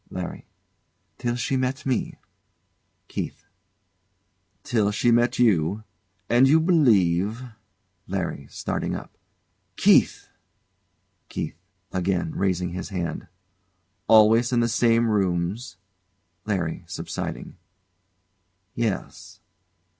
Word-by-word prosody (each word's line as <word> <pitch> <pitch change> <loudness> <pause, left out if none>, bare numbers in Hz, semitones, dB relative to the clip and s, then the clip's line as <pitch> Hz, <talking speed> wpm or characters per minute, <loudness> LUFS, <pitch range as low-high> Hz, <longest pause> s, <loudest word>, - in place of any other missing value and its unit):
LARRY. - - -6 0.7
Till 120 0 -1
she 125 +2 -1
met 130 +3 -2
me. 130 -3 -1 0.9
KEITH. - - -6 1.2
Till, 110 -4 +1
she 105 +4 +2
met 120 +2 +3
you? 105 -3 +2 0.4
And 120 +3 +5
you 155 +4 +5
believe? 110 - +3 0.6
LARRY. 70 - -3
[Starting - - -3
up] - - -9 0.6
Keith! - - +3 1.0
KEITH. 80 - -5 0.3
[Again 90 -2 -1
raising 90 -2 -1
his 90 +2 -5
hand] 90 -5 -4 0.8
Always 110 +2 +6
in 120 -1 +2
the 115 - +2
same 115 0 +3
rooms? 95 0 -1 0.7
LARRY. 90 -6 -2
[Subsiding] - - -6 1.2
Yes. 115 -5 -4
110 Hz, 90 wpm, -24 LUFS, 90-120 Hz, 1.2 s, Always